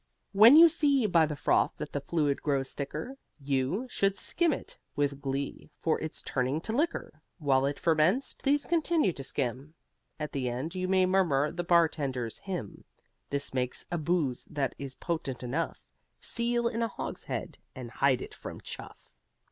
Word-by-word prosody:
When 220 Hz, +7 st, +8 dB
you 335 Hz, +2 st, +10 dB
see 290 Hz, -6 st, +2 dB
by 170 Hz, -6 st, +4 dB
the 150 Hz, -, -4 dB
froth -, -, +2 dB
that -, -, -6 dB
the -, -, -2 dB
fluid 150 Hz, -4 st, 0 dB
grows 135 Hz, -3 st, -1 dB
thicker 155 Hz, -, -5 dB, 0.2 s
You, 140 Hz, -, -1 dB
should 195 Hz, -5 st, +1 dB
skim 335 Hz, -, +1 dB
it -, -, -5 dB, 0.2 s
(with 140 Hz, -1 st, 0 dB
glee) 140 Hz, +1 st, -4 dB
for 160 Hz, -, +1 dB
it's 160 Hz, -, -5 dB
turning 130 Hz, +3 st, 0 dB
to 220 Hz, -, -4 dB
liquor! 265 Hz, -, -1 dB, 0.2 s
While 135 Hz, -4 st, +2 dB
it 140 Hz, -, -2 dB
ferments, 170 Hz, -, +2 dB
please 285 Hz, +1 st, +1 dB
continue 325 Hz, -, +2 dB
to 135 Hz, -, -7 dB
skim: 135 Hz, +3 st, -3 dB, 0.4 s
At 150 Hz, -1 st, -4 dB
the 130 Hz, -3 st, -1 dB
end, 130 Hz, +8 st, -4 dB
you 185 Hz, -1 st, -2 dB
may 185 Hz, 0 st, +4 dB
murmur 165 Hz, -7 st, +2 dB
the 175 Hz, +1 st, -3 dB
Bartender's 145 Hz, -9 st, +1 dB
Hymn. 180 Hz, -, -6 dB, 0.5 s
This 140 Hz, -1 st, -2 dB
makes 125 Hz, -1 st, -2 dB
a 175 Hz, -, -1 dB
booze 155 Hz, -6 st, 0 dB
that 140 Hz, -4 st, -2 dB
is 135 Hz, -2 st, -5 dB
potent 140 Hz, -7 st, -3 dB
enough 145 Hz, +7 st, -2 dB, 0.4 s
Seal 235 Hz, 0 st, 0 dB
in 235 Hz, -1 st, -2 dB
a 230 Hz, -, +2 dB
hogshead 220 Hz, -, -5 dB, 0.2 s
and 125 Hz, -3 st, -7 dB
hide 130 Hz, +1 st, +2 dB
it -, -, -10 dB
from -, -, -8 dB
Chuff! -, -, -10 dB
155 Hz, 170 wpm, -29 LUFS, 135-195 Hz, 0.5 s, you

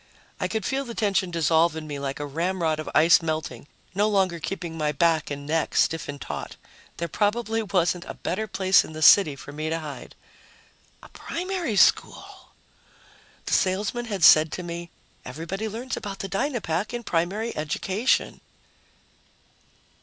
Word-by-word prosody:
I -, -, 0 dB
could 220 Hz, -3 st, -3 dB
feel 270 Hz, +1 st, -1 dB
the 235 Hz, -3 st, -8 dB
tension 195 Hz, -4 st, +1 dB
dissolve 165 Hz, 0 st, +2 dB
in 160 Hz, -1 st, -6 dB
me 145 Hz, -2 st, -5 dB
like 140 Hz, 0 st, -4 dB
a 145 Hz, -, -3 dB
ramrod 165 Hz, +1 st, -1 dB
of 155 Hz, -, -5 dB
ice 165 Hz, +3 st, +6 dB
melting, 155 Hz, -6 st, -4 dB, 0.3 s
no 205 Hz, +3 st, +2 dB
longer 190 Hz, -4 st, +1 dB
keeping 170 Hz, -1 st, -5 dB
my 150 Hz, -2 st, 0 dB
back 160 Hz, +1 st, +1 dB
and 145 Hz, 0 st, -6 dB
neck 160 Hz, +1 st, -1 dB
stiff 165 Hz, -1 st, +1 dB
and 145 Hz, 0 st, -6 dB
taut. -, -, -6 dB, 0.4 s
There 170 Hz, -, -2 dB
probably 225 Hz, +5 st, 0 dB
wasn't 180 Hz, -3 st, 0 dB
a -, -, -7 dB
better 215 Hz, +5 st, -3 dB
place 190 Hz, -1 st, +3 dB
in -, -, -10 dB
the 155 Hz, 0 st, -4 dB
city 155 Hz, -4 st, +7 dB
for 140 Hz, -, -10 dB
me 155 Hz, +2 st, -4 dB
to 165 Hz, -, -1 dB
hide. 155 Hz, -3 st, -8 dB, 0.9 s
A -, -, -13 dB
primary 355 Hz, -, -4 dB
school! -, -, +1 dB, 1.0 s
The -, -, -2 dB
salesman 205 Hz, +6 st, 0 dB
had 200 Hz, -6 st, -4 dB
said 155 Hz, -1 st, +7 dB
to 180 Hz, -, -4 dB
me, 170 Hz, 0 st, -6 dB, 0.3 s
"Everybody 170 Hz, +11 st, -5 dB
learns 240 Hz, +5 st, -5 dB
about 200 Hz, -2 st, -6 dB
the 195 Hz, -, -5 dB
Dynapack 195 Hz, -, -2 dB
in 240 Hz, -, -5 dB
primary 200 Hz, +6 st, -1 dB
education." 185 Hz, +9 st, -1 dB
175 Hz, 160 wpm, -25 LUFS, 155-210 Hz, 1.0 s, city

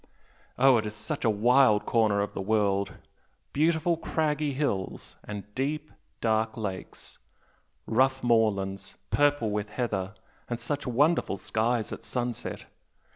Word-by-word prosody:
Oh, 130 Hz, -1 st, +6 dB
it 110 Hz, -1 st, -1 dB
is 105 Hz, -, -6 dB
such 140 Hz, +8 st, -3 dB
a 115 Hz, -, +4 dB
wild 110 Hz, +1 st, +4 dB
corner 110 Hz, -3 st, +2 dB
of 100 Hz, -, -3 dB
the -, -, -4 dB
world! 100 Hz, -1 st, +1 dB, 0.6 s
Beautiful 160 Hz, +2 st, +2 dB
craggy 150 Hz, -2 st, 0 dB
hills 130 Hz, -9 st, -2 dB
and 105 Hz, -1 st, -6 dB, 0.8 s
dark, 110 Hz, 0 st, +1 dB
deep -, -, -15 dB
lakes 100 Hz, -4 st, -6 dB, 0.7 s
rough 130 Hz, +3 st, +2 dB
moorlands 100 Hz, -5 st, +1 dB
purple 145 Hz, -6 st, +2 dB
with 105 Hz, 0 st, -2 dB
heather 105 Hz, -4 st, -2 dB, 0.3 s
and 120 Hz, -1 st, -2 dB
such 140 Hz, +4 st, -3 dB
wonderful 140 Hz, -, +2 dB
skies 110 Hz, +2 st, 0 dB
at -, -, -7 dB
sunset! 120 Hz, -1 st, -4 dB
115 Hz, 130 wpm, -28 LUFS, 105-135 Hz, 0.8 s, Oh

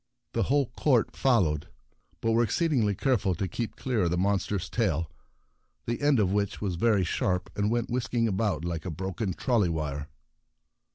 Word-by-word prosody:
The -, -, +1 dB
whole 140 Hz, 0 st, +3 dB
court 130 Hz, -7 st, +2 dB
followed, 90 Hz, -, +2 dB, 0.5 s
but 115 Hz, -, +1 dB
were 115 Hz, +1 st, +4 dB
exceedingly 120 Hz, -, +1 dB
careful 105 Hz, -6 st, +1 dB
to 95 Hz, +3 st, -2 dB
keep 115 Hz, +6 st, -4 dB
clear 120 Hz, -8 st, 0 dB
of -, -, +1 dB
the 90 Hz, -, 0 dB
monster's 100 Hz, 0 st, 0 dB
tail, 85 Hz, -8 st, 0 dB, 0.7 s
the 120 Hz, +3 st, -2 dB
end 145 Hz, -3 st, +4 dB
of 95 Hz, -3 st, +2 dB
which 100 Hz, -1 st, -1 dB
was 100 Hz, -3 st, -2 dB
very 100 Hz, +2 st, +2 dB
sharp 90 Hz, +1 st, -1 dB
and 105 Hz, 0 st, +1 dB
went 120 Hz, +1 st, -1 dB
whisking 120 Hz, -1 st, 0 dB
about 95 Hz, -6 st, 0 dB
like 85 Hz, -2 st, -3 dB
a 90 Hz, -, -4 dB
broken 95 Hz, +3 st, -3 dB
trolley 115 Hz, -8 st, +2 dB
wire. 75 Hz, -2 st, -3 dB
100 Hz, 170 wpm, -28 LUFS, 90-115 Hz, 0.7 s, were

